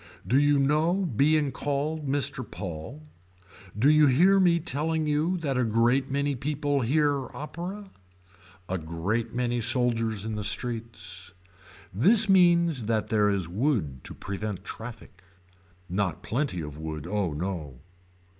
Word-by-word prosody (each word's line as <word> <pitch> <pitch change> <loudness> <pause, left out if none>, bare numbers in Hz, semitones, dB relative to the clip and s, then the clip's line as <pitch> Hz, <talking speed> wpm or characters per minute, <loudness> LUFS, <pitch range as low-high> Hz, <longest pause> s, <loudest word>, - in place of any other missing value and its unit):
Do 130 +4 +3
you 145 0 +3
know 150 +5 +2 0.2
being 145 +2 +3
called 145 +2 -3
Mr. 135 -1 0
Paul. 100 - -8 0.7
Do 120 +6 +3
you 155 0 +6
hear 180 +9 +5
me 175 -2 +4
telling 160 0 -2
you 155 +5 0
that 140 -6 -2
a - - +2
great 120 +4 +2
many 140 +1 -1
people 145 +1 -1
hear 140 +2 +1
opera. 185 +6 -7 0.8
A 95 0 -2
great 100 +9 -3
many 120 -1 -1
soldiers 115 -3 0
in 110 - -3
the 105 - -4
streets. 100 -5 -3 0.6
This 205 - +7
means 170 - +4
that 110 -2 -1
there 105 -2 +3
is 95 -4 -1
wood 90 - -1
to - - -6
prevent 100 0 -5
traffic. 110 -5 -10 0.7
Not 90 -3 -2
plenty 120 - -2
of 75 -1 -8
wood 80 -1 -6
oh 95 -3 -1
no. 75 -6 -5
125 Hz, 135 wpm, -27 LUFS, 100-150 Hz, 0.8 s, This